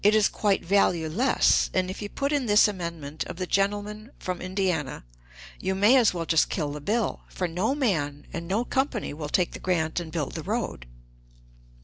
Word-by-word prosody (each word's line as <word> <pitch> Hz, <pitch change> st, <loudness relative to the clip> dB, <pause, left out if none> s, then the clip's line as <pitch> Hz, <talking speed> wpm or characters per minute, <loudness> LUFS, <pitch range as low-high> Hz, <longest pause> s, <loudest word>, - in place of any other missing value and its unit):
It 210 Hz, +2 st, +5 dB
is 215 Hz, -2 st, +4 dB
quite 205 Hz, -2 st, 0 dB
valueless; 185 Hz, +4 st, +3 dB
and 185 Hz, -1 st, +2 dB
if 190 Hz, -, -8 dB
you 205 Hz, -, -4 dB
put 280 Hz, +5 st, -2 dB
in 285 Hz, -4 st, 0 dB
this 210 Hz, +1 st, +6 dB
amendment 170 Hz, -6 st, -4 dB
of 180 Hz, -, -7 dB
the 185 Hz, +1 st, -3 dB
gentleman 205 Hz, +3 st, -1 dB
from 185 Hz, -1 st, -4 dB
Indiana, 185 Hz, -, -1 dB, 0.6 s
you 190 Hz, 0 st, -1 dB
may 205 Hz, +7 st, +5 dB
as 245 Hz, -5 st, +5 dB
well 170 Hz, -2 st, -3 dB
just 160 Hz, -1 st, +3 dB
kill 150 Hz, -6 st, -2 dB
the 150 Hz, 0 st, -6 dB
bill, 215 Hz, +8 st, -1 dB
for 180 Hz, -, -2 dB
no 185 Hz, +10 st, 0 dB
man 150 Hz, -, -1 dB
and 170 Hz, 0 st, -5 dB
no 210 Hz, +7 st, 0 dB
company 265 Hz, -, -1 dB
will 150 Hz, -1 st, -5 dB
take 180 Hz, +2 st, +1 dB
the -, -, -8 dB
grant 165 Hz, -3 st, 0 dB
and 165 Hz, -2 st, -7 dB
build 155 Hz, -5 st, -3 dB
the -, -, -4 dB
road." -, -, -3 dB
185 Hz, 195 wpm, -26 LUFS, 165-210 Hz, 0.6 s, this